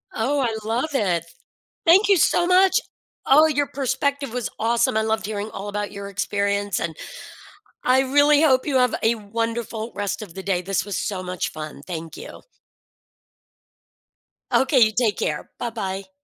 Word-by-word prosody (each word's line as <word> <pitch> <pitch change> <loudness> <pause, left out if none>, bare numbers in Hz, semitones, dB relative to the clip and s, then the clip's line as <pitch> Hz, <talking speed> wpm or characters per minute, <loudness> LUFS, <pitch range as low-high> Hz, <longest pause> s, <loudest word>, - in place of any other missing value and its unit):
Oh, 275 +6 0
I 235 -5 0
love 240 +7 0
it, 180 -10 +1
th 170 - -20 0.5
thank 380 +5 +6
you 395 - +5
so 345 +1 +3
much, 370 +1 +5 0.5
oh, 300 +4 +6
your 290 -2 0
perspective 275 0 -2
was 250 -2 -2
awesome, 230 0 +1
I 220 - +3
loved 220 -1 -1
hearing 210 0 -4
all 195 - -7
about 205 0 -3
your 200 -1 -7
experience, 200 0 -1
and 160 -2 -3 0.9
I 255 +1 +4
really 285 +3 +4
hope 260 -5 +3
you 285 -3 0
have 250 -2 +3
a 225 +1 +3
wonderful 230 +1 -4
rest 205 +2 -3
of 195 -6 -9
the 190 - -7
day. 190 -2 0
This 195 0 -1
was 205 -2 -4
so 190 -3 -3
much 180 -1 -3
fun, 155 -2 -8
thank 165 -3 -6
you. - - -10 2.1
Okay, 265 0 +3
you 220 -2 +5
take 220 -2 +1
care, 150 - -3
buh-bye. 195 -5 -4
220 Hz, 165 wpm, -23 LUFS, 200-265 Hz, 2.1 s, thank